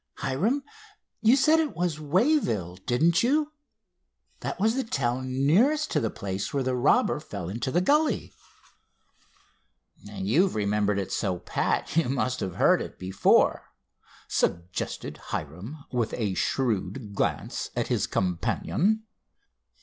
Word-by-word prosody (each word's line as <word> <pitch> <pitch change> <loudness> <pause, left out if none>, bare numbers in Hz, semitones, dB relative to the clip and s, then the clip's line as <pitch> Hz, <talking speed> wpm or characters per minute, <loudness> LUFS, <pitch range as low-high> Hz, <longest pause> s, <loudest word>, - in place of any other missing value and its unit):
Hiram, 200 - 0 0.6
you 225 +3 +6
said 305 +4 +4
it 315 -2 -1
was 170 -3 -1
Wayville, 150 - +1
didn't 160 +8 +3
you? 295 +5 +2 0.9
That - - -4
was 220 +3 +3
the 265 +1 -1
town 130 - -1
nearest 275 - +3
to 150 - +2
the 115 -5 -1
place 95 -1 -4
where 140 -2 0
the 130 0 0
robber 125 +3 +3
fell 100 - -7
into 115 +6 -3
the 175 +7 +2
gully." 300 +9 +1 1.7
"You've 190 -1 +1
remembered 105 -1 +1
it 100 -2 -3
so 95 -3 -1
pat 90 - -1
you 165 -6 +2
must 130 -1 -1
have 95 -3 -4
heard - - +4
of - - -3
it - - -33
before," 95 0 +2 0.6
suggested 85 +1 -2
Hiram, 95 - -6
with 120 -3 -1
a 105 -5 -1
shrewd 115 0 -1
glance - - -2
at - - -1
his - - +1
companion. 175 - 0
135 Hz, 135 wpm, -27 LUFS, -, 1.7 s, you